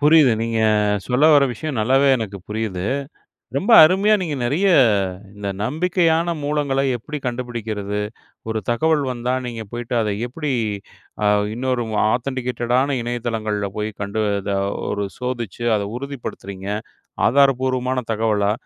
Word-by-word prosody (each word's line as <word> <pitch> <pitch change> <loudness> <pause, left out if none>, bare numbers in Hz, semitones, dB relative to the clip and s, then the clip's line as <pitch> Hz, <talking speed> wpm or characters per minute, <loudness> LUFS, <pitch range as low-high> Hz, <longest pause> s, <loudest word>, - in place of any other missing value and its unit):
புரியுது. 150 -4 +6
நீங்க 115 -1 -1 0.5
சொல்ல 125 +4 +2
வர 140 -1 +6
விஷயம் 135 +1 -4
நல்லாவே 135 +5 +3
எனக்கு 100 -3 -5
புரியுது. 105 -4 -3 0.7
ரொம்ப 205 +10 +1
அருமையா 195 +6 +4
நீங்க 155 -5 -2
நிறைய 170 +11 +2 0.7
இந்த 100 -1 -4
நம்பிக்கையான 165 - +1
மூலங்கள 145 -2 0 0.2
எப்படி 150 +6 -6
கண்டுபிடிக்கிறது? 110 -5 -3 0.5
ஒரு 110 0 -1
தகவல் 150 +4 +2
வந்தா 125 0 -2
நீங்க 115 -2 -5
போய்ட்டு 120 0 -4
அத 105 -2 0 0.2
எப்படி 150 +4 -4 0.7
அ - - +3 0.3
இன்னொரு 125 0 -1 0.3
ஆதென்டிகேட்டடான 125 +1 0
இணையதளங்கள்ல 110 -4 -2
போய் 105 0 -2
கண்டு 100 +2 -2 0.2
அத 100 - -3 0.4
ஒரு 100 0 -1
சோதித்து 120 -3 -4
அத 105 - -1 0.2
உறுதிப்படுத்துறீங்க? 110 -8 -7 0.6
ஆதாரப்பூர்வமான 130 -1 +2
தகவலா? 105 -2 +1
125 Hz, 120 wpm, -21 LUFS, 110-140 Hz, 0.7 s, புரியுது